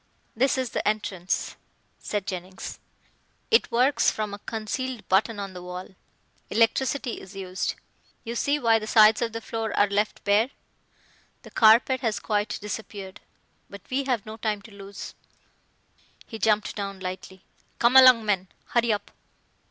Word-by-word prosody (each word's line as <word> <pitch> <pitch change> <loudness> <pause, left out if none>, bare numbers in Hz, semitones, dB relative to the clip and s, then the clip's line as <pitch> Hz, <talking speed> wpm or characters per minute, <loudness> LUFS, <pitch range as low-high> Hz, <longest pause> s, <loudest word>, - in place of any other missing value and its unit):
"This 265 +4 +2
is 255 -3 -2
the - - -2
entrance," 195 -4 -2 0.4
said 205 -2 -3
Jennings, 185 0 -6 0.7
"it 455 - +4
works 255 +4 +3
from 210 -2 -3
a 205 - -7
concealed 225 +3 -4
button 205 +3 +2
on 195 -1 -5
the 180 - -8
wall. 180 +1 -7 0.6
Electricity 245 +3 +1
is 190 +1 -13
used. 190 -1 -3 0.5
You 230 - -5
see 285 +4 +1
why 230 -5 +3
the 215 - -7
sides 215 0 +6
of 235 -1 0
the 230 +1 -5
floor 225 -1 -4
are - - +6
left 205 +1 -1
bare; 210 +5 +3 0.9
the - - -13
carpet 235 +4 +5
has 225 -3 -1
quite 210 -1 -1
disappeared. 205 -2 -7 0.5
But 200 -1 -10
we 270 +1 0
have 245 -6 -1
no 215 0 -8
time 210 -2 -2
to 215 - -14
lose," 200 0 -9 1.1
he 225 - -8
jumped 215 -1 +1
down 195 -2 -5
lightly. 185 0 -7 0.3
"Come 235 +2 +3
along 255 -4 +8
men, 190 -3 0 0.2
hurry 235 -1 +2
up." 205 -1 -3
215 Hz, 150 wpm, -26 LUFS, 200-235 Hz, 1.1 s, along